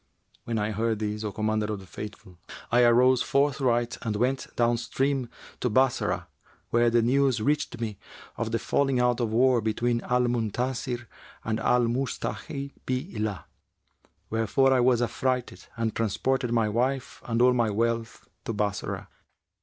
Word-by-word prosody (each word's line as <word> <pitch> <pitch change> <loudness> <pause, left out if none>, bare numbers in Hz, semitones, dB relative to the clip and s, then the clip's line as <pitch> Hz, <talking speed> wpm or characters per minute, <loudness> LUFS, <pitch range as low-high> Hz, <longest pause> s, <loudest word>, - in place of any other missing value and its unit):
When 115 -1 -2
I 105 0 0
heard 110 +1 0
this, 105 0 -3
O 105 - -2
Commander 110 0 -1
of 105 - -3
the 95 - -12
Faithful, 95 -2 -9 0.3
I 120 +1 +5
arose 125 +1 +5
forthright 135 -4 +1
and 110 -3 -2
went 130 +5 0
down 120 0 +2
stream 130 +1 -1 0.3
to 125 - 0
Bassorah, 130 +3 +1 0.5
where 120 0 +4
the 115 0 +3
news 135 0 +3
reached 145 +5 0
me 110 -4 -4 0.4
of 115 -1 -3
the 115 - +1
falling 135 +1 +1
out 125 0 +2
of 115 -3 0
war 125 +1 +4
between 115 +2 0
Al 125 0 +1
Muntasir 120 +1 -1 0.4
and 110 0 -1
Al 125 +2 +3
Musta'нn 135 +3 -3
bi 130 +7 -2
'llah;[FN#373] 105 -3 -2 0.9
wherefore 115 +5 +3
I 130 - +3
was 120 -1 +3
affrighted 125 +1 -2
and 115 -1 -1
transported 120 +3 0
my 115 -2 +2
wife 130 +4 -1
and 115 -1 0
all 125 +1 +6
my 120 -3 +2
wealth 115 +2 -2 0.2
to 115 - -2
Bassorah. 105 -1 -2
120 Hz, 155 wpm, -27 LUFS, 110-130 Hz, 0.9 s, all